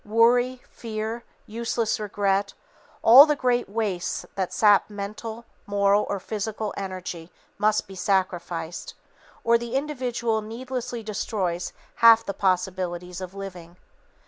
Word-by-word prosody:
Worry, 245 +3 +3
fear, 225 +1 -5 0.2
useless 230 0 -1
regret, 200 -1 0 0.5
all 265 +7 +10
the 300 - +2
great 245 -5 0
wastes 200 -4 -2
that 190 -2 -2
sap 205 -1 +4
mental, 215 +3 -6 0.2
moral 200 0 +2
or 200 - -1
physical 215 +1 -4
energy 185 -3 -6 0.3
must 215 +1 +2
be 195 - -10
sacrificed, 175 -3 -2 0.5
or 230 0 +4
the 235 +1 -5
individual 245 -6 -1
needlessly 245 +1 -5
destroys 195 -4 -2 0.3
half 230 0 +7
the 200 - -3
possibilities 180 -2 -1
of 185 +1 -7
living. 180 -3 -9
210 Hz, 120 wpm, -25 LUFS, 190-230 Hz, 0.5 s, all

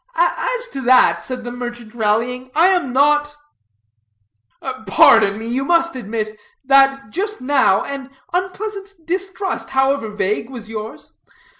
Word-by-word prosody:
"As - - 0
to 270 - -6
that," 255 0 +4
said 255 -1 -6
the 240 - -6
merchant, 240 -2 -7
rallying, 240 +3 -1
"I 335 +4 +5
am 350 -9 +1
not 295 +2 +2 0.7
" 110 +1 -11
"Pardon 200 +1 +5
me, 220 - -7
but 235 - -3
you 265 +2 0
must 335 +2 +2
admit, 215 -2 -5 0.3
that 270 -3 +3
just 410 +3 -3
now, 255 -7 +2
an 275 -1 -6 0.2
unpleasant 395 +2 -4
distrust, 380 +2 -3
however 265 -3 +1
vague, 210 +2 -2
was 235 -5 -9
yours. 220 0 -8
260 Hz, 140 wpm, -19 LUFS, 225-335 Hz, 0.7 s, I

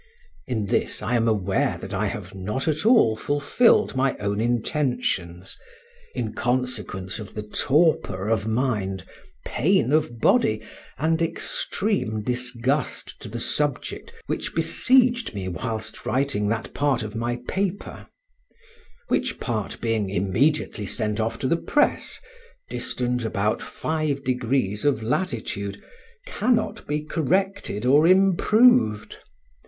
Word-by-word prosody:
In 115 -5 -1
this 100 - 0
I 110 +3 -1
am 115 -1 +2
aware 95 -4 +1
that 95 +3 -7
I 105 +2 0
have 100 -2 -6
not 105 - -3
at 155 +6 +1
all 225 - +5
fulfilled 145 - +2
my 135 0 +1
own 100 0 -2
intentions, 120 - -1 0.6
in 120 -4 -3
consequence 120 -6 -2
of 105 - -9
the 105 - -4
torpor 105 - +1
of 110 -1 0
mind, 110 -6 -1 0.4
pain 180 -1 +2
of 150 -7 +1
body, - - +3 0.3
and 160 +2 +1
extreme 195 - -1
disgust 125 +3 -1
to - - -7
the 120 +3 -5
subject 150 - -2
which - - -4
besieged 250 - +3
me 95 -2 -4
whilst 110 +6 -4
writing 130 -4 0
that 115 +2 -2
part 140 -5 +1
of 105 -1 -6
my 120 +1 -2
paper; 195 0 -3 1.0
which - - -1
part 110 -4 -3
being 110 -4 0
immediately 105 - 0
sent 105 -1 -2
off 115 +1 -1
to 130 - -2
the 170 - +2
press 295 - 0 0.5
(distant 125 -1 -2
about 105 -1 0
five 155 -3 -2
degrees 125 -5 0
of 140 -7 +1
latitude), 100 - -2 0.5
cannot 225 +1 0
be 150 +1 -1
corrected 165 - -1
or 145 +5 +5
improved. 195 - +4
120 Hz, 125 wpm, -24 LUFS, 105-155 Hz, 1.0 s, all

